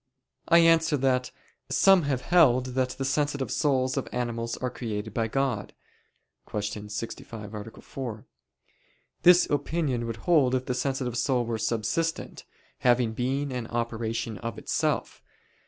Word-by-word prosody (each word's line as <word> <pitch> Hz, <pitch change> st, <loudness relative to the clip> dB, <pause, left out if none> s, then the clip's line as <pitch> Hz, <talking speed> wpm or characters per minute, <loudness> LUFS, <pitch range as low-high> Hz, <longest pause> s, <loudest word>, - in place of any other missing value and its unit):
I 170 Hz, -, +6 dB
answer 165 Hz, -2 st, +5 dB
that, 125 Hz, -1 st, +1 dB, 0.4 s
Some 195 Hz, -2 st, +5 dB
have 130 Hz, -3 st, 0 dB
held 130 Hz, -7 st, +4 dB
that 130 Hz, 0 st, +1 dB
the 135 Hz, -, -2 dB
sensitive 140 Hz, 0 st, -1 dB
souls 130 Hz, -2 st, +1 dB
of 135 Hz, -, -2 dB
animals 115 Hz, -1 st, -3 dB
are 125 Hz, -1 st, -3 dB
created 110 Hz, -3 st, -5 dB
by 115 Hz, 0 st, 0 dB
God 125 Hz, -4 st, -1 dB, 0.8 s
(Q. 105 Hz, 0 st, -4 dB
65, 105 Hz, 0 st, -6 dB
A. 105 Hz, +1 st, -8 dB
4). 120 Hz, -6 st, -7 dB, 1.0 s
This 175 Hz, 0 st, +7 dB
opinion 145 Hz, -4 st, -1 dB
would 115 Hz, -, -3 dB
hold 140 Hz, -7 st, +4 dB
if 130 Hz, 0 st, -1 dB
the 125 Hz, -, -1 dB
sensitive 125 Hz, -1 st, -2 dB
soul 125 Hz, -3 st, +1 dB
were 115 Hz, -1 st, -3 dB
subsistent, 115 Hz, +11 st, -2 dB, 0.3 s
having 120 Hz, -2 st, +3 dB
being 135 Hz, +4 st, -1 dB
and 125 Hz, -2 st, -4 dB
operation 115 Hz, -2 st, -3 dB
of 115 Hz, -2 st, -5 dB
itself. -, -, -1 dB
125 Hz, 140 wpm, -27 LUFS, 115-140 Hz, 1.0 s, This